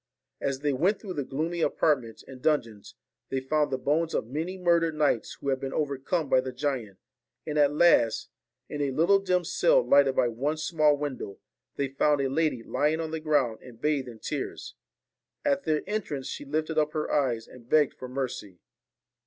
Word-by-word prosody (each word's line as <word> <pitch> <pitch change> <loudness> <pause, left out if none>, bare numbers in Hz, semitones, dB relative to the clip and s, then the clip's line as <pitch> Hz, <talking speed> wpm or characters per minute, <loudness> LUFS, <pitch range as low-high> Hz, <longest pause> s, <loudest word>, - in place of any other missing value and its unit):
As 135 -1 -2
they 145 -1 +1
went 185 +10 +1
through 195 -4 -6
the 145 - -2
gloomy 160 +6 -3
apartments 130 -9 0
and 130 -1 -11
dungeons, 115 -10 -1 0.3
they 135 - -1
found 150 +3 +1
the 130 - -1
bones 160 +5 0
of - - 0
many 160 +10 -4
murdered 170 -3 +2
knights 145 -7 +1
who 140 - -3
had 135 -1 +1
been 135 0 -4
overcome 145 +2 -1
by 130 - +4
the 130 0 -5
giant, 125 -7 -3 0.5
and 150 - -4
at 145 -1 +5
last, 150 -8 +3 0.4
in 145 - -4
a 140 - +1
little 170 +9 +4
dim 180 -2 +1
cell - - +3
lighted 140 -2 +5
by 125 - +3
one 135 +7 -2
small 155 -2 +2
window, 140 -9 -5 0.4
they 140 - -1
found 145 +2 +2
a 135 -1 0
lady 150 -4 0
lying 150 +6 0
on 160 -1 -3
the 160 - -3
ground 145 -8 +1
and 120 -3 -13
bathed 145 -4 0
in 120 -2 -9
tears. 390 - -5 0.7
At 280 -1 +1
their 155 -1 +1
entrance 185 -11 -3
she - - -6
lifted 155 +2 -1
up 150 0 0
her 155 -1 -2
eyes 125 -6 0
and 120 -1 -15
begged 150 -3 +4
for 130 - -8
mercy. 125 -8 -4
145 Hz, 190 wpm, -27 LUFS, 130-160 Hz, 0.7 s, at